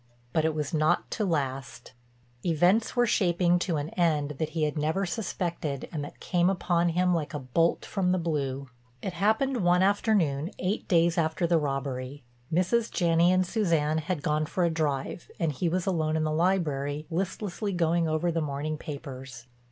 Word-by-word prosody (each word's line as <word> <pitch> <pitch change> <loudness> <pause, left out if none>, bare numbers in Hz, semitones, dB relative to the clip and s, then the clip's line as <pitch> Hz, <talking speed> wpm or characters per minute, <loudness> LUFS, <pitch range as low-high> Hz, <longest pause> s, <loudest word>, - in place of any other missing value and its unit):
But 160 -1 +2
it 160 -1 +1
was 150 -1 -3
not 155 +2 +1
to 215 - -1
last—events 135 - -1
were 245 -1 +4
shaping 175 -4 +2
to 175 -3 -1
an 145 +2 -3
end 155 -5 +1
that 155 - -1
he 155 - +1
had 150 -1 0
never 160 +6 0
suspected 175 - -3
and 150 -3 -3
that 145 - -9
came 175 0 +2
upon 175 -2 +1
him 180 +2 +2
like 160 -2 -2
a - - -2
bolt 155 +6 +1
from 185 -3 0
the 185 - +2
blue. 140 -5 -2 0.4
It 190 - -3
happened 220 +9 +1
one 180 -3 +3
afternoon 190 -7 +2
eight 195 +4 -2
days 170 0 +3
after 160 +2 0
the 170 -1 +3
robbery. 135 -1 -3 0.3
Mrs. 200 +7 +2
Janney 170 0 +3
and 185 0 +3
Suzanne 165 -7 +1
had 160 -1 -3
gone 155 0 0
for 175 +3 -1
a 170 - +2
drive 155 0 -2
and 165 -3 +1
he 165 +5 -1
was 180 +1 -1
alone 160 -4 0
in 155 - 0
the 155 - 0
library, 155 -4 0
listlessly 195 +3 -2
going 170 -2 +1
over 160 +2 0
the 165 0 -1
morning 150 +1 -3
papers. 135 -4 -8
165 Hz, 175 wpm, -28 LUFS, 150-180 Hz, 0.4 s, were